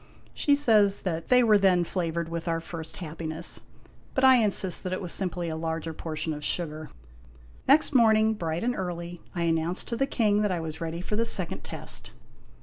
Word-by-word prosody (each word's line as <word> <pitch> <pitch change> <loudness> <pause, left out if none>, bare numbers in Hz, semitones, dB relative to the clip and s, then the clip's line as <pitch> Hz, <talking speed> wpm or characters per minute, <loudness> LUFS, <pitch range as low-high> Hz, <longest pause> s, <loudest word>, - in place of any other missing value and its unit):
She 285 - +3
says 215 -8 +3
that 165 -3 -3
they 250 0 +5
were 215 -3 +5
then 185 -3 +4
flavored 170 -1 -2
with 165 +1 -5
our 165 -1 0
first 165 -1 -7
happiness; 160 -1 -3 0.5
but 265 - +1
I 260 -1 +8
insist 200 -5 +3
that 185 - -3
it 185 - -2
was 180 -3 -5
simply 180 -2 -2
a 160 - -3
larger 160 0 -3
portion 160 0 -4
of 150 0 -7
sugar. 155 -2 -2 0.8
Next 295 +2 +5
morning, 220 -3 +5
bright 165 -4 -3
and 245 +1 +1
early, 175 -3 -5
I 170 - -1
announced 165 +2 -1
to 235 - -1
the 270 +3 0
King 210 -6 +2
that 210 -2 +1
I 180 - -1
was 160 0 -6
ready 165 +1 -4
for 210 - -3
the 230 +2 +1
second 185 -6 -1
test. - - -5
175 Hz, 195 wpm, -27 LUFS, 165-215 Hz, 0.8 s, I